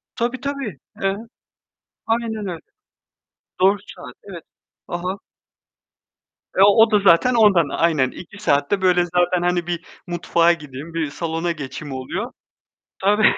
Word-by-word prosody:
Tabii, 245 Hz, +2 st, -1 dB
tabii. 275 Hz, -, -4 dB, 0.2 s
Eee, 195 Hz, 0 st, 0 dB, 0.9 s
aynen 225 Hz, -2 st, -1 dB
öyle. 170 Hz, -2 st, -4 dB, 1.0 s
Doğru 195 Hz, +2 st, +5 dB, 0.2 s
saat. 125 Hz, -3 st, -10 dB
Evet. 185 Hz, -5 st, -9 dB, 0.5 s
Hı -, -, -1 dB
hı. 180 Hz, +3 st, -4 dB, 1.4 s
Eee, 190 Hz, -, +7 dB
o 220 Hz, +3 st, +6 dB
da 210 Hz, -, +5 dB
zaten 200 Hz, +5 st, +5 dB
ondan. 200 Hz, -10 st, +4 dB
Aynen. 155 Hz, -6 st, +1 dB
2 185 Hz, +3 st, -11 dB
saat 140 Hz, -6 st, +2 dB
de, 200 Hz, -1 st, +1 dB
böyle, 180 Hz, -1 st, +3 dB
zaten, 175 Hz, +1 st, +1 dB
hani, 175 Hz, -1 st, 0 dB
bir 175 Hz, 0 st, -3 dB, 0.2 s
mutfağa 170 Hz, 0 st, +2 dB
gideyim, 150 Hz, 0 st, -9 dB
bir 165 Hz, -3 st, -1 dB
salona 165 Hz, +2 st, -2 dB
geçeyim 145 Hz, -2 st, -6 dB
oluyor. 180 Hz, -, -4 dB, 0.7 s
Tabii. 210 Hz, +2 st, +4 dB
175 Hz, 135 wpm, -21 LUFS, 165-205 Hz, 1.4 s, Eee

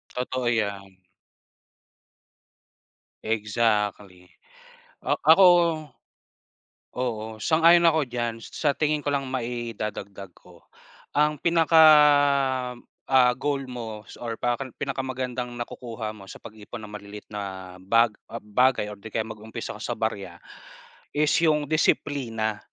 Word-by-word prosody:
Totoo 125 Hz, 0 st, -2 dB
yan. 100 Hz, -4 st, -3 dB, 2.3 s
Exactly. 105 Hz, -4 st, -1 dB, 0.8 s
Ah, -, -, 0 dB
ako, 165 Hz, +5 st, +8 dB, 1.5 s
oo, 110 Hz, -3 st, -4 dB
sang-ayon 165 Hz, +6 st, +5 dB
ako 160 Hz, -2 st, +3 dB
diyan, 120 Hz, -3 st, -4 dB
sa 145 Hz, +4 st, -1 dB
tingin 150 Hz, -1 st, 0 dB
ko 145 Hz, -, -8 dB
lang 140 Hz, -1 st, 0 dB
maidadagdag 110 Hz, -6 st, -5 dB
ko, -, -, -20 dB, 0.5 s
ang 150 Hz, 0 st, +2 dB
pinaka 165 Hz, 0 st, +3 dB, 1.3 s
ah, 125 Hz, -2 st, +6 dB
goal 140 Hz, -1 st, -1 dB
mo 110 Hz, -3 st, -7 dB
s -, -, -14 dB
or 115 Hz, -1 st, -4 dB
pakan 120 Hz, +2 st, -3 dB
pinakamagandang 130 Hz, -2 st, -4 dB
nakukuha 120 Hz, -2 st, -6 dB
mo 100 Hz, -3 st, -13 dB
sa -, -, -12 dB
pag-ipon 110 Hz, +1 st, -10 dB
ng 105 Hz, -, -10 dB
maliliit 105 Hz, 0 st, -10 dB
na 95 Hz, -3 st, -7 dB
bag 115 Hz, +5 st, +3 dB, 0.2 s
ah, 115 Hz, -, -8 dB
bagay 105 Hz, 0 st, +1 dB
or 105 Hz, -, -10 dB
'di 110 Hz, +1 st, -11 dB
kaya 110 Hz, -, +1 dB
mag-umpisa 110 Hz, 0 st, -7 dB
ako -, -, -10 dB
sa -, -, -3 dB
barya, -, -, -3 dB, 0.8 s
is 150 Hz, 0 st, +2 dB
'yong 155 Hz, -2 st, +2 dB
disiplina. 120 Hz, -8 st, 0 dB
115 Hz, 115 wpm, -25 LUFS, 105-135 Hz, 2.3 s, ako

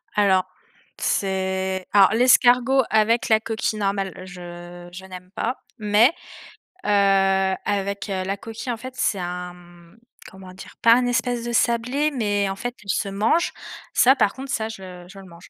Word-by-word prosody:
Alors, 190 Hz, -3 st, +3 dB, 0.5 s
c'est 190 Hz, -1 st, -1 dB
alors 195 Hz, -2 st, +6 dB
l'escargot 250 Hz, +2 st, +4 dB
avec 220 Hz, +2 st, +2 dB
la 220 Hz, -1 st, +5 dB
coquille 220 Hz, -1 st, -3 dB
normale, 195 Hz, -1 st, -1 dB
je 175 Hz, -1 st, -10 dB
je 190 Hz, +2 st, -10 dB
n'aime 185 Hz, -1 st, -11 dB
pas 255 Hz, -, -2 dB, 0.2 s
mais 210 Hz, +2 st, +4 dB, 0.8 s
heu, -, -, -1 dB, 0.8 s
avec 200 Hz, 0 st, -2 dB
heu, 190 Hz, -1 st, -2 dB
la 195 Hz, +1 st, -2 dB
coquille, 225 Hz, +4 st, -6 dB
en 230 Hz, -, -3 dB
fait, 255 Hz, +3 st, -9 dB
c'est 200 Hz, -6 st, 0 dB
un, 180 Hz, 0 st, -5 dB
mmh, 175 Hz, +1 st, -18 dB, 0.3 s
comment 190 Hz, -1 st, -12 dB
dire? 190 Hz, -, -12 dB
Pas 230 Hz, 0 st, +7 dB
un 250 Hz, 0 st, +1 dB
espèce 245 Hz, 0 st, -1 dB
de 240 Hz, -, -3 dB
sablé, 250 Hz, +6 st, +1 dB
mais 205 Hz, -6 st, 0 dB
en 195 Hz, -, -3 dB
fait, 245 Hz, +4 st, -5 dB
il 200 Hz, -, -14 dB
se 195 Hz, +1 st, 0 dB
mange, 220 Hz, -, +1 dB, 0.4 s
ça 260 Hz, +2 st, +5 dB
par 205 Hz, -, +2 dB
contre, 265 Hz, 0 st, -8 dB
ça, 220 Hz, -3 st, -2 dB
je 185 Hz, -4 st, -10 dB
je 195 Hz, 0 st, -12 dB
le 195 Hz, -, -12 dB
mange. 170 Hz, -1 st, -15 dB
200 Hz, 170 wpm, -22 LUFS, 190-235 Hz, 0.8 s, Pas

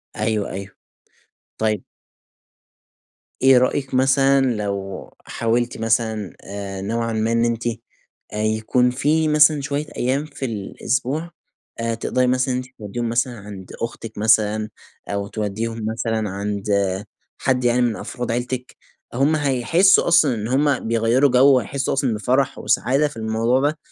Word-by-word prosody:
أيوه، 110 Hz, -1 st, -1 dB
أيوه. 100 Hz, +1 st, -7 dB, 0.8 s
طيب 110 Hz, -3 st, 0 dB, 1.6 s
إيه 130 Hz, -1 st, +7 dB
رأيك 130 Hz, +2 st, 0 dB
مثلًا 135 Hz, +1 st, +4 dB
لو 100 Hz, -2 st, -4 dB, 0.2 s
حاولتِ 120 Hz, +1 st, -1 dB
مثلًا، 110 Hz, -3 st, 0 dB
آآ، 100 Hz, -1 st, -6 dB
نوعًا 115 Hz, +3 st, -2 dB
ما 110 Hz, +1 st, 0 dB
إن 115 Hz, 0 st, +2 dB
أنتِ، 115 Hz, 0 st, -1 dB, 0.7 s
آآ -, -, -4 dB
يكون 110 Hz, +3 st, +2 dB
في 150 Hz, +5 st, +1 dB
مثلًا 150 Hz, -1 st, +5 dB
شوية 140 Hz, +2 st, -2 dB
أيام 135 Hz, +4 st, 0 dB
في 140 Hz, -3 st, -6 dB
الأسبوع 130 Hz, -, -2 dB, 0.5 s
آآ، 115 Hz, 0 st, -1 dB
تقدري 125 Hz, +2 st, 0 dB
مثلًا 130 Hz, +1 st, +1 dB
إن -, -, 0 dB
أنتِ 125 Hz, 0 st, -5 dB
توديهم 115 Hz, +3 st, -4 dB
مثلًا 120 Hz, 0 st, -1 dB
عند 100 Hz, -2 st, -10 dB
أختك 115 Hz, -1 st, -5 dB
مثلًا، 110 Hz, 0 st, +2 dB, 0.4 s
أو 100 Hz, 0 st, -2 dB
تودّيهم 110 Hz, +2 st, -3 dB
مثلًا 110 Hz, -2 st, -2 dB
عند 100 Hz, +1 st, -4 dB, 0.8 s
حد 125 Hz, -1 st, +1 dB
يعني 120 Hz, +1 st, +3 dB
من 120 Hz, -3 st, +1 dB
أفراد 125 Hz, +2 st, -5 dB
عيلتك؟ 125 Hz, +2 st, -3 dB, 0.4 s
هم 140 Hz, +6 st, +2 dB
هيحسّوا 150 Hz, +7 st, +3 dB
أصلًا 155 Hz, -7 st, +4 dB
إن 110 Hz, -1 st, -4 dB
هم 140 Hz, +1 st, +1 dB
بيغيّروا 115 Hz, +5 st, +3 dB
جو 130 Hz, +2 st, +6 dB
وهيحسوا 135 Hz, +3 st, -2 dB
أصلًا 135 Hz, -3 st, +1 dB
بفرح 130 Hz, +5 st, 0 dB
وسعادة 135 Hz, +5 st, +2 dB
في 145 Hz, -, -11 dB
الموضوع 115 Hz, +3 st, +1 dB
ده، 155 Hz, -, -6 dB
120 Hz, 140 wpm, -21 LUFS, 110-135 Hz, 1.6 s, إيه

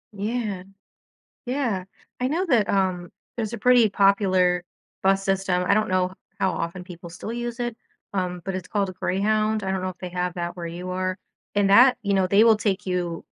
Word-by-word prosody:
Yeah. 210 Hz, -2 st, -3 dB, 0.8 s
Yeah. 245 Hz, -7 st, -1 dB, 0.4 s
I 250 Hz, -, +2 dB
know 340 Hz, +6 st, 0 dB
that, 230 Hz, -9 st, +3 dB
um, 185 Hz, -3 st, 0 dB, 0.2 s
there's 225 Hz, -4 st, -3 dB
a -, -, -3 dB
pretty 240 Hz, 0 st, +5 dB
popular 190 Hz, -3 st, +3 dB, 0.4 s
bus 195 Hz, 0 st, +3 dB
system. 195 Hz, -2 st, +1 dB
I -, -, +5 dB
don't 215 Hz, 0 st, +1 dB
know 185 Hz, 0 st, +1 dB, 0.3 s
how 190 Hz, -, +2 dB
often 180 Hz, +2 st, -4 dB
people 175 Hz, -2 st, -10 dB
still 185 Hz, +6 st, -7 dB
use 240 Hz, 0 st, -4 dB
it, 240 Hz, -1 st, -2 dB, 0.4 s
um, 180 Hz, -2 st, -2 dB
but 190 Hz, -1 st, -3 dB
it's 185 Hz, -, -5 dB
called 200 Hz, -2 st, 0 dB
a 185 Hz, -, -7 dB
Greyhound, 215 Hz, +3 st, 0 dB
I 190 Hz, -, -1 dB
don't 190 Hz, -1 st, -1 dB
know 185 Hz, -, -2 dB
if 185 Hz, -, -10 dB
they 180 Hz, -, -6 dB
have 180 Hz, 0 st, -2 dB
that 175 Hz, 0 st, -4 dB
where 175 Hz, -2 st, -6 dB
you 175 Hz, +2 st, -6 dB
are. 185 Hz, 0 st, -2 dB, 0.4 s
And 200 Hz, -1 st, +3 dB
that 245 Hz, +6 st, +7 dB
you 200 Hz, -1 st, +1 dB
know, 190 Hz, -1 st, +2 dB
they 200 Hz, +4 st, +5 dB
will 225 Hz, -1 st, +7 dB
take 205 Hz, -1 st, -1 dB
you 175 Hz, -3 st, -2 dB
195 Hz, 200 wpm, -24 LUFS, 180-215 Hz, 0.8 s, that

